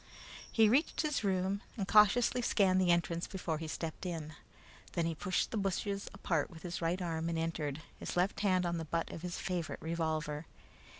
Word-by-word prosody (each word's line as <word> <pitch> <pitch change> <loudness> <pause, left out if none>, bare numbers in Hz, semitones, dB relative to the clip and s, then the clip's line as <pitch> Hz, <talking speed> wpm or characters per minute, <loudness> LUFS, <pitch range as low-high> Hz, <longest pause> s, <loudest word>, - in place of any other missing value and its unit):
He 225 -1 +5
reached 265 +9 +3
his 300 -6 0
room 190 0 +1 0.2
and 195 -3 -2
cautiously 215 +4 +5
scanned 190 -5 +3
the 180 - +2
entrance 170 0 +2
before 170 -5 -3
he 160 - -4
stepped 160 0 -4
in. 165 -4 -4 0.6
Then 170 -2 +1
he 165 - 0
pushed 180 +4 -1
the 225 - -1
bushes 200 0 -1
apart 170 -6 -1
with 160 -2 -12
his 175 -1 -4
right 170 +2 +1
arm 165 -2 -2
and 165 - -1
entered, 160 -2 -2 0.2
his - - -4
left 180 +3 +2
hand 185 -3 +2
on 170 0 0
the 165 - -4
butt 165 +2 -2
of 165 - -7
his 180 0 -4
favorite 175 -3 -3
revolver. 160 -2 -2
175 Hz, 190 wpm, -34 LUFS, 165-195 Hz, 0.6 s, He